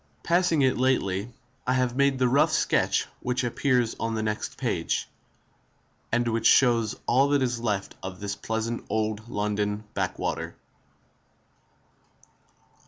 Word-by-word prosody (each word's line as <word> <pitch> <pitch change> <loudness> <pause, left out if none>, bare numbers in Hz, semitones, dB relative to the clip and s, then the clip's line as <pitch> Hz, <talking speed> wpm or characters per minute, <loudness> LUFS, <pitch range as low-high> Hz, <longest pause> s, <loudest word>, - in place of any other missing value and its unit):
Passing 170 -4 +3
it 130 - +3
lately, 115 -5 +1 0.4
I 130 0 +3
made 140 +1 +2
the 130 -1 +3
rough 135 +4 +3
sketch - - +2
which 125 +1 -1
appears 125 -1 +1
on 115 0 -1
next 110 0 -3
page, - - -1 1.0
and 120 0 +1
which 115 -1 +2
shows 115 -5 +4
all 135 +3 +4
that 145 -2 +3
is 120 -2 -1
left 105 -4 -2
of 95 -1 -7
this 100 -1 -3
pleasant 115 +1 -3
old 110 +1 -2
London 105 0 -1
backwater. - - -2
120 Hz, 120 wpm, -26 LUFS, 105-130 Hz, 1.0 s, shows